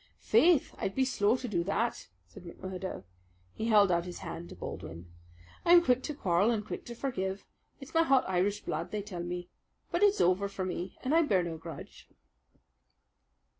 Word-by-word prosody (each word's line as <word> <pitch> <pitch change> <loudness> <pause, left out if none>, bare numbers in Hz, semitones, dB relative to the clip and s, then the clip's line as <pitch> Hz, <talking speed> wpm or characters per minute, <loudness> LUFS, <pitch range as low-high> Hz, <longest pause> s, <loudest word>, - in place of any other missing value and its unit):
"Faith, 335 -4 +4
I'd 195 - -2
be 265 - +2
slow 225 -2 +2
to 250 - -5
do 175 -6 0
that," 225 +4 -1 0.2
said 200 - -14
McMurdo. 185 +2 -6 0.5
He 225 - -3
held 205 -4 +5
out 170 0 +1
his 180 -1 -7
hand 170 +1 -6
to - - -10
Baldwin. 85 +1 -8 0.5
"I'm 345 0 +7
quick 250 -4 +3
to 300 - -5
quarrel 190 - +2
and 215 -3 0
quick - - -6
to 240 - -7
forgive. 195 -7 -3 0.3
It's 270 - -11
my 330 - +5
hot 270 -5 +3
Irish 190 +2 0
blood, - - -3
they 210 -1 -3
tell 185 -4 -6
me. 175 0 -5 0.4
But - - 0
it's 410 0 +4
over 185 +3 +3
for 190 -1 -4
me, 180 0 -5
and 260 - 0
I 330 - +6
bear 200 - +2
no 170 -1 -4
grudge." 165 0 -10
200 Hz, 185 wpm, -30 LUFS, 180-255 Hz, 0.5 s, I'm